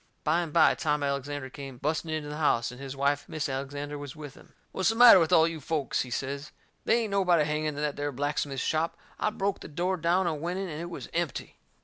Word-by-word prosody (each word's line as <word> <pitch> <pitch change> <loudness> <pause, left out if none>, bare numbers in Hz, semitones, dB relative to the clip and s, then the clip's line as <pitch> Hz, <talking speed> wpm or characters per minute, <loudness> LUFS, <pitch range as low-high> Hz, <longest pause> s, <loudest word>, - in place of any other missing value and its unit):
By 160 +2 +2
and 165 -3 -4
by 165 +1 +5
Tom 150 -1 -1
Alexander 140 -1 -3
come 135 -3 -8
busting 155 +4 -2
into 155 -2 -3
the 150 - -5
house, 125 -6 +1
and 125 +2 -11
his 135 0 -6
wife, 140 +1 0
Mis' 155 - -2
Alexander, 145 +2 -4
was 145 -2 -8
with 150 -3 -9
him. - - -18 0.2
"What's 190 - +1
the 225 - 0
matter 235 -4 +9
with 165 -2 +1
all 160 0 +6
you 165 -2 -5
folks," 150 -2 -1
he 125 - -5
says. 140 +4 -4 0.4
"They 235 +1 +3
ain't 215 - -4
nobody 180 -5 +3
hanging 150 +1 -1
in 150 -1 -2
that 145 0 -2
there 145 0 -2
blacksmith 145 0 -2
shop. 160 +1 0 0.2
I - - +2
broke 200 -2 -2
the - - -9
door 180 +5 -1
down 175 +3 +2
and 155 -4 -2
went 175 +2 -2
in, 195 -1 -3
and 155 0 -5
it 170 - -5
was 170 - -7
empty." 170 -4 -3
150 Hz, 245 wpm, -28 LUFS, 140-170 Hz, 0.4 s, matter